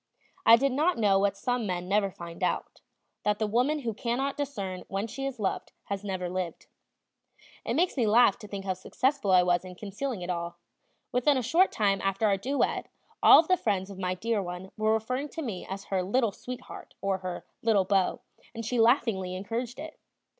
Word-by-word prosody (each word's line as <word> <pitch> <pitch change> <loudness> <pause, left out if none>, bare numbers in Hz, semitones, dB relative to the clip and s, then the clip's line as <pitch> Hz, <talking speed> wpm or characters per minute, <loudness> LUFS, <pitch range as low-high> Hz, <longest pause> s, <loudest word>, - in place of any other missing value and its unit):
I 230 - +11
did 275 +3 +1
not 310 +7 +2
know 200 -3 +4
what 200 0 +1
some 245 -1 -1
men 180 -1 -3
never 200 +1 +2
find 170 -2 -10
out, - - -2 0.4
that 210 0 +1
the 220 - 0
woman 250 +8 +1
who 230 -4 -2
cannot 250 +6 -1
discern 205 -11 -4
when 195 +2 -2
she 270 +5 -4
is 260 -3 -6
loved 195 -3 -2 0.2
has 200 0 -3
never 185 -3 -3
lived. 180 -2 -4 1.0
It 235 - -2
makes 350 +4 +2
me 240 -5 +1
laugh 225 -1 +5
to 210 - -10
think 200 -1 -6
how 190 - 0
successful 255 +5 -1
I 185 -1 +6
was 175 0 +2
in 185 -1 -9
concealing 205 +2 -4
it 175 - -6
all; 170 -1 -4 0.5
within 260 +3 +3
a 255 - -1
short 350 +11 +4
time 200 -2 +1
after 195 +2 0
our 200 -2 +4
duet 270 +9 -1 0.3
all - - +9
of 320 - +4
the 370 - +4
friends 200 - -1
of 190 - -9
my 185 -1 -1
dear 220 +2 -1
one 180 +1 -7
were 215 0 +1
referring 255 +6 -1
to 325 - -5
me 210 -9 -5
as 195 +1 -5
her 190 -2 -1
"little 220 +4 +1
sweetheart," 250 +5 -9
or 195 -1 -1
her 180 -1 -6 0.2
"little 215 -4 +3
beau," 190 -1 +1 0.3
and 230 0 -5
she 245 +2 -1
laughingly 225 -6 +2
encouraged 230 +6 -4
it. 310 +2 -8
210 Hz, 205 wpm, -28 LUFS, 190-250 Hz, 1.0 s, I